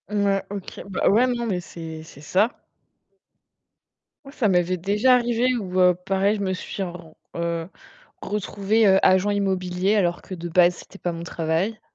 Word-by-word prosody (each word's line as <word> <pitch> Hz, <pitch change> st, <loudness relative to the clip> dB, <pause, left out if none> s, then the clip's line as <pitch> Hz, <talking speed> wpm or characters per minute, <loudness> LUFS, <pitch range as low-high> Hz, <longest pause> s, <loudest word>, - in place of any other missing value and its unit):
Mouais, 200 Hz, -2 st, +1 dB
OK. 200 Hz, -2 st, -7 dB
Bah, 190 Hz, -, +1 dB
ouais 230 Hz, +5 st, +4 dB
non, 240 Hz, -1 st, -1 dB
mais 185 Hz, -5 st, -1 dB
c'est 160 Hz, -2 st, -8 dB
c'est 145 Hz, -3 st, -14 dB
ça. 190 Hz, +8 st, +2 dB, 1.8 s
Ça 275 Hz, -5 st, 0 dB
m'avait 180 Hz, 0 st, +2 dB
déjà 210 Hz, +8 st, +3 dB
arrivé 240 Hz, +1 st, +1 dB
où 185 Hz, -5 st, -1 dB, 0.2 s
pareil, 195 Hz, +2 st, +1 dB
je 205 Hz, -, -4 dB
me 190 Hz, -1 st, -1 dB
suis 190 Hz, +1 st, -5 dB
ren 175 Hz, -3 st, -9 dB, 0.2 s
heu, 170 Hz, -1 st, -2 dB, 0.5 s
retrouvée 210 Hz, +2 st, 0 dB, 0.2 s
agent 190 Hz, +2 st, +4 dB
immobilier 190 Hz, -1 st, 0 dB
alors 175 Hz, -4 st, +1 dB
que 185 Hz, -, -8 dB
de 175 Hz, 0 st, -6 dB
base, 175 Hz, +1 st, +4 dB
c'était 195 Hz, -, -14 dB
pas 175 Hz, -, -2 dB
mon 165 Hz, 0 st, -6 dB
travail. 170 Hz, +6 st, -2 dB
190 Hz, 155 wpm, -23 LUFS, 175-210 Hz, 1.8 s, ouais